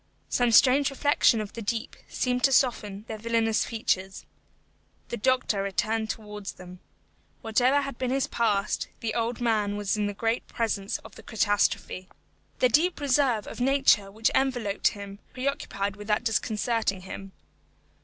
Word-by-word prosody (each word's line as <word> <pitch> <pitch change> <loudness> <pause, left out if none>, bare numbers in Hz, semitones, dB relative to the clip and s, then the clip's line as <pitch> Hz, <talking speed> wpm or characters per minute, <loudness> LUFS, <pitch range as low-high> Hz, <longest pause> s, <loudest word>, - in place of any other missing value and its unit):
Some 245 -1 +2
strange 270 +4 +6
reflection 275 -4 +3
of 210 -1 -7
the 230 - -6
deep 225 +2 -3
seemed 250 0 -1
to 270 - +3
soften 215 -6 +1
their 220 -1 -6
villainous 225 0 +1
features. 195 -4 -2 0.8
The 235 - -3
doctor 245 -4 +1
returned 220 +3 -1
towards 210 -2 -6
them. 180 0 -12 0.6
Whatever 250 +5 +3
had 275 -3 -6
been 255 -1 -1
his 270 +1 +1
past, 210 -4 0
the 225 -2 -2
old 235 +1 -1
man 210 -3 +1
was 205 -1 -1 0.2
great 225 +1 +1
in - - -37
the - - -21
presence 210 -3 -1
of - - -12
the - - -12
catastrophe. 205 -3 0 0.5
The 255 - +3
deep 330 +8 +2
reserve 265 -6 +2
of - - -7
nature 265 -6 +3
which 220 +3 0
enveloped 245 -6 +1
him 200 -1 -5
preoccupied 230 -7 -2
without 210 +2 -1
disconcerting 220 -3 0
him. 190 +1 -9
225 Hz, 150 wpm, -27 LUFS, 205-250 Hz, 0.8 s, strange